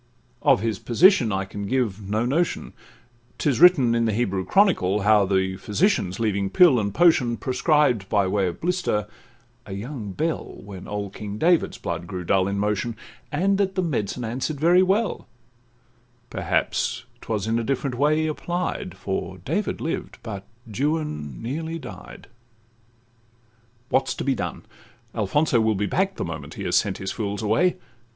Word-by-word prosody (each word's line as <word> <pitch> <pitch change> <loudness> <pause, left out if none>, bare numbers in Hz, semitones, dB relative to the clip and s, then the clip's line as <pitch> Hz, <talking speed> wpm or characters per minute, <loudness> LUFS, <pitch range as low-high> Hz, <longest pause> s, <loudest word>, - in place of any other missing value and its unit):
Of - - +4
his 110 -3 -1
position 125 - +4
I 95 0 -1
can 100 +1 -6
give 110 -5 0
no 110 +3 +1
notion: 160 +8 -1 0.6
'Tis 140 -5 0
written 150 -10 +7
in 115 0 +2
the 110 - +1
Hebrew 100 -4 0
Chronicle, 105 - +3
How 105 -1 +4
the 95 -1 0
physicians, 105 - 0
leaving 100 -3 0
pill 150 - +6
and 100 -1 -1
potion, 125 - +3
Prescribed, 130 - +1
by 100 -3 +2
way 95 0 +1
of 85 - -5
blister, 175 - 0 0.6
a 95 - -6
young 110 0 -6
belle, 160 - -2
When 95 -2 -9
old 100 -1 -4
King 105 -1 -6
David's 170 +6 +2
blood 85 0 -4
grew 90 -1 -5
dull 95 +2 +2
in 100 0 -2
motion, 105 +3 -1 0.4
And 195 +6 +1
that 195 -2 0
the 185 - +1
medicine 125 - -2
answer'd 130 +6 -3
very 175 +4 +5
well; 195 +4 0 1.0
Perhaps 115 +1 -1 0.2
'twas 105 -4 -2
in 115 +1 +1
a - - -2
different 135 +1 -1
way 150 +4 +2
applied, 175 +3 -3
For - - -4
David - - -2
lived, - - -4
but 100 -3 -7 0.2
Juan 115 - -3
nearly 160 +7 -3
died. 130 -6 -10 1.6
What 135 0 +2
's - - -2
to - - -4
be 135 - +2
done? - - -4 0.5
Alfonso 120 +4 +2
will 110 -1 +2
be 105 +1 0
back 190 - 0
The - - -3
moment 80 -3 -7
he - - -6
has - - 0
sent - - +2
his 95 - -4
fools 105 -1 -3
away. 115 - +2
115 Hz, 160 wpm, -24 LUFS, 100-155 Hz, 1.6 s, written